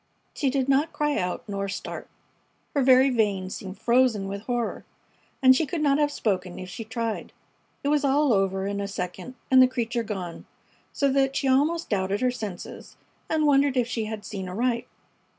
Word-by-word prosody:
She 280 Hz, -, 0 dB
did 265 Hz, 0 st, 0 dB
not 280 Hz, +4 st, +2 dB
cry 295 Hz, -1 st, 0 dB
out 180 Hz, +3 st, -3 dB
nor 200 Hz, -1 st, -3 dB
start. -, -, -6 dB, 0.7 s
Her 285 Hz, -, +2 dB
very 260 Hz, +1 st, +6 dB
veins 200 Hz, -5 st, 0 dB
seemed 190 Hz, 0 st, -7 dB
frozen 235 Hz, -3 st, +2 dB
with 200 Hz, +1 st, -5 dB
horror, 240 Hz, -2 st, -2 dB, 0.6 s
and 260 Hz, 0 st, +8 dB
she 305 Hz, +3 st, +1 dB
could 335 Hz, -, -3 dB
not 285 Hz, -1 st, +3 dB
have 295 Hz, -1 st, +2 dB
spoken 185 Hz, -8 st, -2 dB
if 185 Hz, 0 st, -7 dB
she 225 Hz, -, -6 dB
tried. 225 Hz, 0 st, -4 dB, 0.5 s
It 280 Hz, -, 0 dB
was 295 Hz, -1 st, +2 dB
all 280 Hz, -1 st, +3 dB
over 195 Hz, -1 st, +1 dB
in 200 Hz, 0 st, -2 dB
a 200 Hz, -, -3 dB
second 195 Hz, +6 st, -5 dB, 0.2 s
and 260 Hz, 0 st, +8 dB
the 255 Hz, -, +7 dB
creature 240 Hz, -1 st, -2 dB
gone, 190 Hz, -6 st, -6 dB, 0.4 s
so 280 Hz, -, +1 dB
that 270 Hz, 0 st, +2 dB
she 275 Hz, -, 0 dB
almost 300 Hz, +6 st, +2 dB
doubted 195 Hz, +1 st, 0 dB
her 255 Hz, 0 st, +2 dB
senses 210 Hz, -7 st, -7 dB, 0.3 s
and 315 Hz, -1 st, +2 dB
wondered 280 Hz, -2 st, +3 dB
if 245 Hz, -2 st, +2 dB
she 225 Hz, -2 st, -2 dB
had 215 Hz, -1 st, -6 dB
seen 190 Hz, -3 st, -5 dB
aright. 235 Hz, +5 st, -1 dB
240 Hz, 185 wpm, -26 LUFS, 200-270 Hz, 0.7 s, and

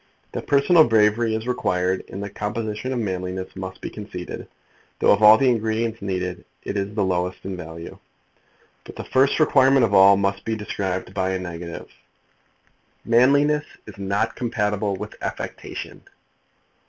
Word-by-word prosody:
That -, -, -6 dB
personal 150 Hz, +4 st, +5 dB
bravery 110 Hz, 0 st, +3 dB
is 110 Hz, +2 st, -4 dB
required 95 Hz, -7 st, 0 dB
in 95 Hz, -, -7 dB
the 100 Hz, -, -5 dB
composition 105 Hz, +3 st, -4 dB
of 130 Hz, -, -1 dB
manliness 95 Hz, -3 st, -4 dB
must 95 Hz, -1 st, -7 dB
be -, -, -6 dB
conceded, 95 Hz, -4 st, -7 dB, 0.5 s
though, -, -, +4 dB
of 100 Hz, -, +3 dB
all 105 Hz, +1 st, +9 dB
the 135 Hz, -, +2 dB
ingredients 110 Hz, 0 st, -1 dB
needed, 90 Hz, -2 st, -3 dB, 0.2 s
it -, -, -4 dB
is 100 Hz, +1 st, -3 dB
the 105 Hz, -, +1 dB
lowest 90 Hz, 0 st, -2 dB
in 95 Hz, -1 st, -4 dB
value. 85 Hz, -1 st, -9 dB, 0.8 s
But -, -, -12 dB
the -, -, -6 dB
first 135 Hz, +3 st, +2 dB
requirement 135 Hz, -4 st, +5 dB
of 100 Hz, -, -3 dB
all 100 Hz, 0 st, +7 dB
must 100 Hz, 0 st, -1 dB
be 110 Hz, -, -2 dB
described 95 Hz, -3 st, -4 dB
by 95 Hz, -1 st, -1 dB
a -, -, 0 dB
negative. 85 Hz, -1 st, -7 dB, 1.2 s
Manliness 140 Hz, +5 st, +3 dB, 0.2 s
is 100 Hz, -2 st, -12 dB
not 100 Hz, +1 st, -1 dB
compatible 105 Hz, -4 st, -1 dB
with -, -, -7 dB
affectation. -, -, -6 dB
105 Hz, 155 wpm, -23 LUFS, 95-115 Hz, 1.2 s, all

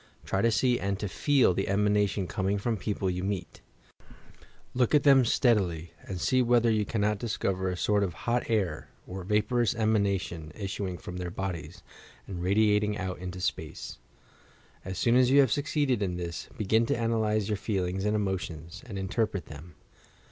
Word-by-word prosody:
Try 95 Hz, -, 0 dB
to 115 Hz, -, +4 dB
see 120 Hz, +2 st, +2 dB
and 100 Hz, 0 st, -1 dB
to 105 Hz, -, -4 dB
feei 130 Hz, +2 st, +3 dB
the 95 Hz, -, -1 dB
emanation 105 Hz, 0 st, +1 dB
coming 95 Hz, +3 st, -1 dB
from 115 Hz, +3 st, -1 dB
people 100 Hz, -1 st, -2 dB
you 90 Hz, 0 st, -1 dB
meet; 95 Hz, -3 st, -4 dB, 1.1 s
look 125 Hz, +3 st, +2 dB
at 145 Hz, -, +4 dB
them 135 Hz, -2 st, +7 dB
steadily, 95 Hz, -, +1 dB
and 95 Hz, -2 st, -4 dB
see 130 Hz, +9 st, +2 dB
whether 120 Hz, -1 st, +3 dB
yon 105 Hz, -1 st, +1 dB
cannot 105 Hz, 0 st, 0 dB
dis 115 Hz, -2 st, -3 dB
cover 95 Hz, -1 st, -1 dB
a 90 Hz, -, -3 dB
sort 105 Hz, +2 st, +2 dB
of 90 Hz, -5 st, -3 dB
hot 120 Hz, 0 st, 0 dB
air 95 Hz, -9 st, -1 dB, 0.2 s
or 95 Hz, 0 st, -7 dB
vaporous 105 Hz, +4 st, +1 dB
emanation 100 Hz, -7 st, 0 dB
issuing 95 Hz, -3 st, -4 dB
from 90 Hz, +2 st, -8 dB
their 90 Hz, -1 st, -4 dB
bodies, 85 Hz, -3 st, -5 dB, 0.4 s
and 90 Hz, -3 st, -6 dB
radiating 105 Hz, +2 st, +2 dB
out 95 Hz, -2 st, -4 dB
into 90 Hz, 0 st, -6 dB
space. 80 Hz, -7 st, -4 dB, 0.8 s
As 95 Hz, 0 st, -5 dB
soon 120 Hz, +4 st, +3 dB
as 125 Hz, 0 st, +5 dB
you 140 Hz, +2 st, +6 dB
have 135 Hz, -5 st, +5 dB
succeeded 145 Hz, -5 st, +1 dB
in 90 Hz, -3 st, -1 dB
this, 85 Hz, -1 st, -5 dB
begin 110 Hz, +2 st, +2 dB
to -, -, +1 dB
analyse 110 Hz, -3 st, 0 dB
your 105 Hz, -, 0 dB
feelings 95 Hz, -2 st, -2 dB
and 105 Hz, +1 st, +1 dB
emotions, 90 Hz, -4 st, -3 dB
and 100 Hz, -5 st, -6 dB
interpret 95 Hz, 0 st, -1 dB
them. 75 Hz, +2 st, -11 dB
100 Hz, 175 wpm, -28 LUFS, 90-110 Hz, 1.1 s, them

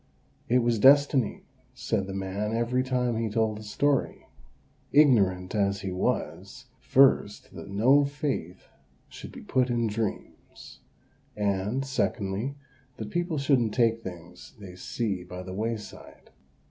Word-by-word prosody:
"It 125 Hz, 0 st, +3 dB
was 120 Hz, -2 st, +1 dB
destiny," 135 Hz, -2 st, +4 dB, 0.3 s
said 100 Hz, -4 st, -2 dB
the 95 Hz, -, -6 dB
man 100 Hz, +3 st, -3 dB
every 120 Hz, +2 st, +1 dB
time 125 Hz, -2 st, -1 dB
he 115 Hz, -1 st, -1 dB
told 110 Hz, 0 st, 0 dB
the -, -, -10 dB
story; 140 Hz, +7 st, -1 dB, 0.7 s
ignorant 100 Hz, -11 st, +4 dB
as 100 Hz, -2 st, 0 dB
he 95 Hz, -1 st, -4 dB
was, 95 Hz, +3 st, -3 dB
first, 130 Hz, -6 st, +3 dB
that -, -, -9 dB
no 125 Hz, +9 st, +4 dB
faith 140 Hz, -, -4 dB, 0.5 s
should -, -, -10 dB
be -, -, -10 dB
put 130 Hz, -1 st, +1 dB
in 120 Hz, -1 st, 0 dB
dreams; 110 Hz, -1 st, -6 dB, 0.6 s
and, 105 Hz, +5 st, -1 dB
secondly, 115 Hz, -1 st, -2 dB, 0.4 s
that 105 Hz, -1 st, -6 dB
people 175 Hz, -2 st, -1 dB
shouldn't 130 Hz, -6 st, +1 dB
take 115 Hz, -2 st, +2 dB
things 90 Hz, 0 st, -10 dB
they 100 Hz, -4 st, -10 dB
see 95 Hz, 0 st, -3 dB
by 90 Hz, +1 st, -8 dB
the 95 Hz, 0 st, -8 dB
wayside. 110 Hz, +1 st, -6 dB
110 Hz, 135 wpm, -27 LUFS, 100-130 Hz, 0.7 s, destiny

